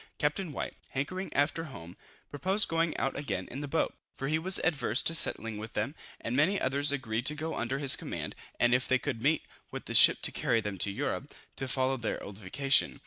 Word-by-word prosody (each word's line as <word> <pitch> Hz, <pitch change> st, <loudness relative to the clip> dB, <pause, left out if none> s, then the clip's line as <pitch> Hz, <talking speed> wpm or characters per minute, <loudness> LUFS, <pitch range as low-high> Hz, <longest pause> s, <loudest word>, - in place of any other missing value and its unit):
Captain 155 Hz, +3 st, -1 dB
White, -, -, -4 dB, 0.2 s
hankering 185 Hz, +8 st, -3 dB
after 145 Hz, +3 st, +1 dB
home, 85 Hz, -, -10 dB, 0.4 s
proposed 190 Hz, +8 st, +3 dB
going 165 Hz, 0 st, 0 dB
out 135 Hz, -, -1 dB
again 100 Hz, -10 st, -3 dB
in 135 Hz, -, -5 dB
the 145 Hz, -, -4 dB
boat; 160 Hz, +4 st, 0 dB, 0.2 s
for 135 Hz, -, -3 dB
he 155 Hz, +1 st, +1 dB
was 185 Hz, +3 st, +4 dB
adverse 140 Hz, -8 st, +2 dB
to 165 Hz, -, +1 dB
settling 115 Hz, -8 st, +2 dB
with 110 Hz, +1 st, -8 dB
them; 140 Hz, -, -2 dB, 0.3 s
and 115 Hz, -, -3 dB
many 170 Hz, +9 st, +3 dB
others 140 Hz, +2 st, +2 dB
agreed 120 Hz, -5 st, -2 dB
to 150 Hz, -, +5 dB
go 160 Hz, +2 st, -4 dB
under 125 Hz, +3 st, -2 dB
his 140 Hz, -2 st, +4 dB
command; -, -, -5 dB, 0.3 s
and 120 Hz, 0 st, +4 dB
if 125 Hz, 0 st, +2 dB
they 130 Hz, -, +3 dB
could 130 Hz, -4 st, -4 dB
meet 150 Hz, +5 st, +2 dB, 0.3 s
with -, -, -7 dB
a -, -, -4 dB
ship -, -, +7 dB
to -, -, +4 dB
carry 115 Hz, -, +1 dB
them 105 Hz, -3 st, -5 dB
to 100 Hz, -, +3 dB
Europe, 100 Hz, -, -3 dB, 0.2 s
to 135 Hz, -, -3 dB
follow 130 Hz, +1 st, 0 dB
their 115 Hz, -3 st, -3 dB
old 100 Hz, 0 st, -8 dB
vocation. 135 Hz, +8 st, +2 dB
135 Hz, 215 wpm, -30 LUFS, 120-155 Hz, 0.4 s, ship